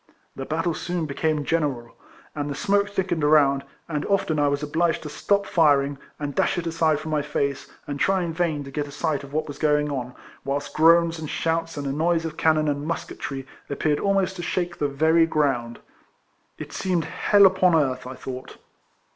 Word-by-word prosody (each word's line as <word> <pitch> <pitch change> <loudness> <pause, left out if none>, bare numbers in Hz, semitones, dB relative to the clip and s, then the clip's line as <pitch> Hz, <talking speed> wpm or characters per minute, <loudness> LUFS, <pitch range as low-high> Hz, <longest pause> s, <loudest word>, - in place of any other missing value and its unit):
The 135 - -5
battle 165 +2 0
soon 175 0 -3
became 155 +1 -1
general; 140 -8 -1 0.4
the 145 -1 -3
smoke 200 +4 +1
thickened 185 -5 -1
around, 140 -2 +4 0.2
and 150 -3 -2
often 170 -6 +1
I 145 - +3
was 140 +1 -1
obliged 165 +3 0
to 150 - -6
stop 200 +6 0
firing, 145 -4 +3 0.2
and 145 -1 -3
dash - - +1
it 175 - -2
aside 160 -2 +1
from 155 0 -6
my 150 -1 +1
face, 140 -1 -2 0.2
and 145 -1 -5
try 190 +2 +2
in 165 -1 -3
vain 160 -4 -1
to 135 - -10
get 145 +1 -3
a - - -10
sight 150 -1 -2
of 140 - -11
what 155 +2 -1
was 145 - -8
going 150 -1 +2
on, 125 -2 -4 0.3
whilst 140 +1 -3
groans 165 +1 +4
and 155 -2 -6
shouts 165 -1 -1
and 145 - -4
a 135 - -1
noise 165 +3 +1
of 160 -1 -5
cannon 155 -1 +2
and 145 +1 -2
musketry 135 -4 -4 0.2
appeared 145 +1 0
almost 195 -1 +1
to - - -4
shake 175 0 -2
the 145 - +1
very 160 +4 +3
ground. 135 -7 0 0.8
It - - -8
seemed 180 -4 -1 0.3
liell 205 -1 +8
upon 185 -2 +4
earth 130 -5 0
I 130 - -7
thought. 130 0 -8
155 Hz, 195 wpm, -24 LUFS, 145-165 Hz, 0.8 s, liell